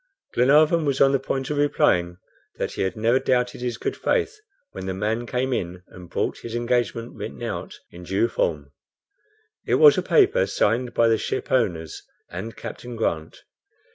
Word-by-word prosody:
Glenarvan 150 +6 +4
was 140 -2 0
on 135 0 +6
the 135 - +2
point 135 +1 -3
of 150 - -2
replying 90 -11 +2 0.4
that - - -3
he - - -4
had 95 -1 -1
never 115 +4 +3
doubted 125 -2 0
his 120 -2 -3
good - - -3
faith, 450 -2 0 0.4
when 95 - -7
the 95 - -2
man 110 +4 -2
came 130 +2 -1
in 90 -3 -4
and 90 -1 -13
brought - - -2
his 115 0 -7
engagement 120 -1 -1
written - - -7
out - - -5
in 85 - -11
due 95 +6 0
form. 75 -9 -2 1.0
It - - +3
was 450 -2 +7
a - - 0
paper 430 +3 +3
signed 120 +3 0
by 115 - +4
the 115 -1 +3
shipowners 85 - -1 0.3
and 95 +6 -6
Captain 120 -1 -7
Grant. 80 -8 -3
120 Hz, 170 wpm, -24 LUFS, 95-130 Hz, 1.0 s, was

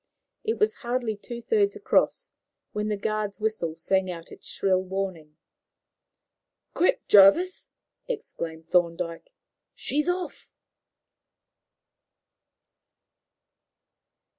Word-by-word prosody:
It 445 +1 -1
was 425 0 +3
hardly 240 -3 -1
two 235 +3 -8
thirds 410 - +2
across 425 +4 +1 0.4
when 210 0 -2
the 210 -1 -1
guard's 210 -1 -2
whistle 215 -7 -1
sang 185 +3 +1
out 165 -2 -7
its - - -9
shrill 190 -1 +1
warning. 185 -5 -5 1.4
"Quick, 360 - +1
Jervis," 260 - +6 0.4
exclaimed 170 - -5
Thorndyke; 170 - 0 0.4
"she's 300 +5 0
off!" 360 0 -3
210 Hz, 90 wpm, -26 LUFS, -, 1.4 s, Jervis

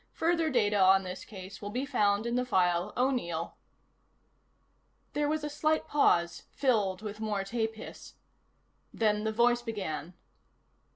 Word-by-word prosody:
Further 330 -1 +1
data 210 -6 +2
on 190 0 +6
this 185 0 -6
case 195 -1 -10
will 205 - -5
be 250 +6 -2
found 205 -4 +1
in 235 - -2
the 250 - +1
file 180 -4 +1
O'Neill." 240 -11 -1 1.6
There 295 0 0
was 310 0 -1
a - - -1
slight 310 +1 0
pause, 170 -12 +2
filled 210 -7 0
with 210 0 -6
more 210 -3 -1
tape 225 +2 -2
hiss. 220 - -10 0.8
Then 210 -1 +1
the 220 - +1
voice 240 +2 +3
began. 185 -8 -5
215 Hz, 140 wpm, -30 LUFS, 195-250 Hz, 1.6 s, on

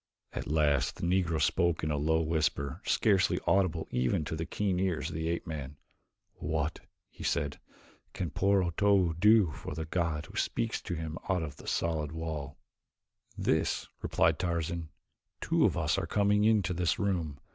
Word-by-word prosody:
At - - -4
last 75 -3 +2
the - - -9
Negro 85 -3 +1
spoke 85 +2 +1
in 75 - 0
a - - +1
low 80 +3 +2
whisper, 80 -3 -1
scarcely 100 -4 +3
audible 90 -4 +2
even 65 +5 +1
to 80 - -3
the 80 +1 -4
keen 95 -3 -1
ears 90 -4 0
of 80 - -7
the 80 0 -2
ape 85 - -2
man. 75 -3 -6 0.6
"What," 75 0 -2 0.3
he - - -12
asked, 70 0 -1 0.5
"can 85 -5 -4
poor 100 +2 +3
Otobu 90 0 +3
do 105 -3 +5
for 70 - -7
the 80 0 -3
god 80 -2 -1
who - - -14
speaks 115 -1 -1
to 90 - -4
him 80 0 -5
out 90 -3 +1
of 75 -2 -6
the - - -12
solid 80 -2 -1
wall?" 80 -3 -5 0.8
"This," - - +1 0.2
replied - - +2
Tarzan. 85 -2 -2 0.5
"Two - - +2
of - - +1
us - - +1
are - - -3
coming 105 +1 +3
into 105 -5 +3
this 90 -1 +1
room. 85 -8 -1
80 Hz, 170 wpm, -30 LUFS, 75-95 Hz, 0.8 s, do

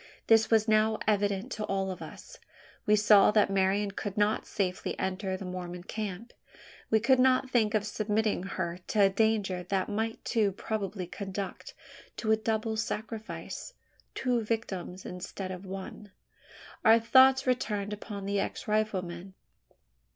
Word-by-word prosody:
This 225 -1 +5
was 220 -1 +3
now 215 0 +3
evident 205 +2 +1
to 215 - -3
all 195 -1 -1
of 185 - -8
us. - - -10 0.5
We 210 - +6
saw 210 -1 +6
that 210 -2 +3
Marian 195 +1 +1
could 200 0 -5
not 210 +1 +1
safely 190 -3 -2
enter 190 0 -2
the 195 - -7
Mormon 180 -1 -6
camp. 215 +3 -5 0.6
We 220 - +4
could 260 +4 +3
not 260 0 +3
think 220 -3 +2
of 210 -1 +1
submitting 215 -1 0
her 180 -2 -4
to 210 - +1
a 195 - +6
danger 200 -3 +1
that 190 +2 -1
might 220 +2 -3
too 210 -4 +1
probably 195 -2 -3
conduct 195 +1 -6 0.4
to 220 - 0
a - - +6
double 220 0 -1
sacrifice 220 - -5 0.4
two 250 -2 +1
victims 195 -5 -4
instead 185 +1 -6
of 185 +1 -8
one. 195 +2 -8 0.7
Our 225 +1 +7
thoughts 265 +3 +6
turned 205 -1 -3
upon 205 -1 -7
the 200 0 0
ex - - -4
rifleman. 190 -4 -2
210 Hz, 150 wpm, -29 LUFS, 190-220 Hz, 0.7 s, Our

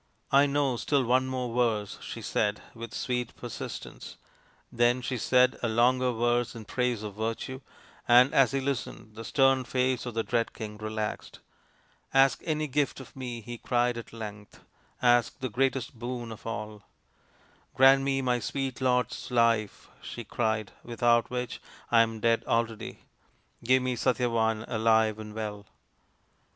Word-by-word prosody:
" - - -37
I 145 - +4
know 140 -3 +1
still 140 +2 +1
one 130 +2 +2
more 125 -2 -3
verse, 110 -4 +1
55 - - -12
she - - -6
said 105 0 0
with 115 -1 -8
sweet 125 -2 -3
persistence. - - -8 0.5
Then 120 +1 +3
she 130 +1 -2
said 125 +2 +3
a 120 - 0
longer 125 +3 +3
verse 120 +1 0
in 110 -2 -8
praise 125 -2 -1
of 105 -2 -5
Virtue, 115 +5 -4 0.5
and 125 +3 +6
as 135 -2 +5
he 135 - 0
listened 130 -5 -4
the 115 +1 -8
stern 135 +1 +3
face 125 0 0
of 120 - -6
the 115 - 0
dread 115 0 -1
King 105 -2 -7
relaxed. 110 0 -4 0.4
" - - -35 0.3
Ask 135 0 +5
any 155 -1 0
gift 140 0 0
of 130 - -12
me," 125 -3 -5
he 120 +1 -8
cried 120 -1 +1
at 115 - -8
length. 105 -2 -9 0.2
" - - -37
Ask 120 -1 +3
the 130 - -3
greatest 130 +2 0
boon 120 -1 -5
of 110 +1 -9
all" 105 -2 -5 0.5
" - - -34
Grant 135 +1 +7
me 135 0 0
my 125 -1 +1
sweet 135 +1 -3
lord's 125 -2 0
life," 115 -4 +1
she - - -7
cried, 110 -3 -1
" - - -31
without 120 -1 +2
which 125 -1 -4 0.3
I 115 -1 +7
am 115 -1 -1
dead 115 0 +2
already. 115 -1 -2 0.6
Give 130 +2 +3
me 130 -1 -1
Satyavan, 115 -3 +1
alive 110 -2 +2
and 105 0 -8
well." 105 -2 -5
120 Hz, 165 wpm, -28 LUFS, 110-130 Hz, 0.6 s, Grant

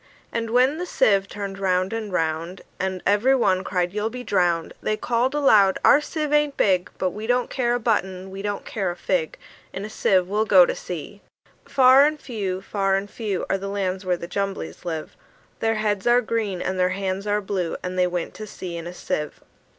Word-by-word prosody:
And 230 -1 -2
when 255 +6 +3
the 360 - -3
sieve 195 - +3
turned 200 -1 -6
round 185 +1 +1
and 220 -3 -4
round, 165 +1 -2 0.2
And 190 -1 -2
every 210 +7 +4
one 190 -7 +2
cried, 180 -1 -1
"You'll 210 0 -2
all - - +1
be 250 +2 -7
drowned!" 175 -6 +1
They 215 - -1
called 245 +5 0
aloud, 210 -10 +5
"Our 295 - +7
sieve 300 -1 -3
ain't 295 -1 +2
big; 185 -3 +2
But 185 -1 0
we 215 +3 -6
don't 245 0 +1
care 240 -2 +1
a - - -1
button, 190 -5 -1
we 195 +1 -6
don't 205 0 -3
care 195 -4 -2
a 175 - -4
fig: 175 -2 -1 0.3
In 195 +2 -5
a 215 - -8
sieve 185 -3 +2
we'll 210 +3 0
go 190 -4 +7
to - - -1
sea!" 180 +4 -7 0.4
Far 265 0 +6
and 305 0 -3
few, 195 -8 -4
far 195 -1 0
and 195 +1 -3
few, 210 -6 -3
Are 195 - 0
the 195 - -5
lands 195 -1 -2
where 180 -1 0
the 170 - -7
Jumblies 195 +1 -4
live: 160 -3 -5 0.4
Their 225 0 +1
heads 210 -1 -1
are 240 +1 +5
green, 215 -5 -2
and 190 0 -2
their 180 0 +3
hands 190 +1 -3
are 205 0 +2
blue 190 -4 -2
And 180 0 -4
they 180 0 +3
went 175 -1 -3
to 215 - -8
sea 180 -3 -7
in 170 0 -6
a 175 - -8
sieve. 150 -3 -4
195 Hz, 215 wpm, -23 LUFS, 185-225 Hz, 0.4 s, Our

